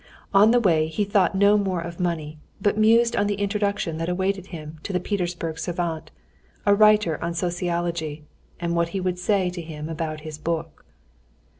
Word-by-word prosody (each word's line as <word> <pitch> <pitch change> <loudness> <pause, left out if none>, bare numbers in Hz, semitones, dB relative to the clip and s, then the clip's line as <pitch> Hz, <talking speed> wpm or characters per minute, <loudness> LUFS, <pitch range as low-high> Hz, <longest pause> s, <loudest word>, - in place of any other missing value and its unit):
On 200 +2 +7
the 245 +1 +5
way 165 -8 +3
he 160 +6 -1
thought 200 -1 +2
no 200 +2 +5
more 190 -3 -1
of 170 +1 -7
money, 160 -4 -2 0.2
but 205 +1 +1
mused 230 +2 +4
on 205 - +2
the 205 - 0
introduction 200 -4 -1
that 165 +1 -2
awaited 190 +1 -1
him 155 -3 -9
to - - -5
the 180 - 0
Petersburg 175 -4 -3
savant, 165 -2 -3 0.6
a 205 - +5
writer 210 -6 +4
on 170 0 -2
sociology, 170 -3 -2 0.4
and 170 -1 -1
what 170 0 +1
he - - 0
would 180 -1 -2
say 185 -1 +1
to 175 -1 -6
him 155 -1 -7
about 155 -1 -4
his 155 -1 -8
book. 165 +1 -4
175 Hz, 180 wpm, -24 LUFS, 165-200 Hz, 0.6 s, On